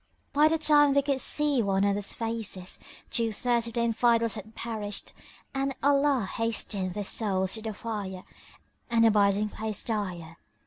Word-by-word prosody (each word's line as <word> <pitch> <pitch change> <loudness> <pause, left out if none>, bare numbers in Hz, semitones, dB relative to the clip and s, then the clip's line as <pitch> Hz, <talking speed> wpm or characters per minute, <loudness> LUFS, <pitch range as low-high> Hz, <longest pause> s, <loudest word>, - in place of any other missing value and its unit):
By 295 +2 +5
the 325 +1 +2
time 295 -2 +5
they 280 0 +3
could 275 -2 0
see 295 -4 +1
one 195 -2 +1
another's 200 0 +1
faces, 225 -5 -4 0.3
two 230 -1 +1
thirds 235 +1 +1
of 230 - -7
the 235 - 0
Infidels 230 0 +2
had 215 +1 -8
perished 215 -3 -4 0.4
and 270 0 -1
Allah 280 -4 +3
hastened 205 -5 -2
their 205 - -2
souls 190 -2 0
to 220 - -4
the 220 0 -4
fire 205 -4 -5 0.7
and 230 -1 +4
abiding 205 -1 +3
place 215 -1 -4
dire. 180 -7 -4
225 Hz, 160 wpm, -28 LUFS, 200-245 Hz, 0.7 s, By